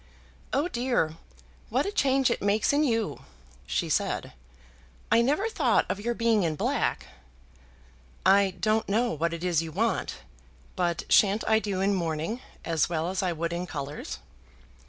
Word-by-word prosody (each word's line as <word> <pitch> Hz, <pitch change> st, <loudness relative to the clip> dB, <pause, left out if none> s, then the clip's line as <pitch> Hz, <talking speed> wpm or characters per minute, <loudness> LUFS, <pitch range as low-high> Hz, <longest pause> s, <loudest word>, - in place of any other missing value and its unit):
"Oh, 285 Hz, +5 st, +1 dB
dear, 240 Hz, -, 0 dB, 0.5 s
what -, -, +1 dB
a 400 Hz, -, -2 dB
change 270 Hz, -, +2 dB
it -, -, -1 dB
makes 205 Hz, +6 st, +2 dB
in 295 Hz, +1 st, +3 dB
you," 225 Hz, -6 st, 0 dB, 0.5 s
she -, -, -1 dB
said. -, -, -1 dB, 0.8 s
"I 230 Hz, -, +6 dB
never 295 Hz, -, +1 dB
thought 450 Hz, -, +2 dB
of -, -, -2 dB
your 235 Hz, +3 st, -2 dB
being 230 Hz, -2 st, +2 dB
in 165 Hz, -3 st, 0 dB
black." -, -, -1 dB, 1.2 s
"I 195 Hz, -1 st, +4 dB
don't 215 Hz, +3 st, +1 dB
know 235 Hz, +4 st, +2 dB
what 165 Hz, +2 st, -1 dB
it 170 Hz, 0 st, -5 dB
is 175 Hz, -3 st, +2 dB
you 165 Hz, -1 st, -6 dB
want, -, -, -1 dB, 0.6 s
but 175 Hz, -2 st, 0 dB
shan't 205 Hz, +1 st, +5 dB
I 220 Hz, 0 st, +4 dB
do 200 Hz, -3 st, -2 dB
in 200 Hz, +1 st, +2 dB
mourning 170 Hz, +6 st, -2 dB, 0.2 s
as 165 Hz, -1 st, +1 dB
well 165 Hz, 0 st, -1 dB
as 190 Hz, -, -1 dB
I 185 Hz, -2 st, 0 dB
would 170 Hz, +1 st, -3 dB
in 175 Hz, +1 st, -3 dB
colours?" 145 Hz, -2 st, -5 dB
200 Hz, 160 wpm, -27 LUFS, 170-235 Hz, 1.2 s, I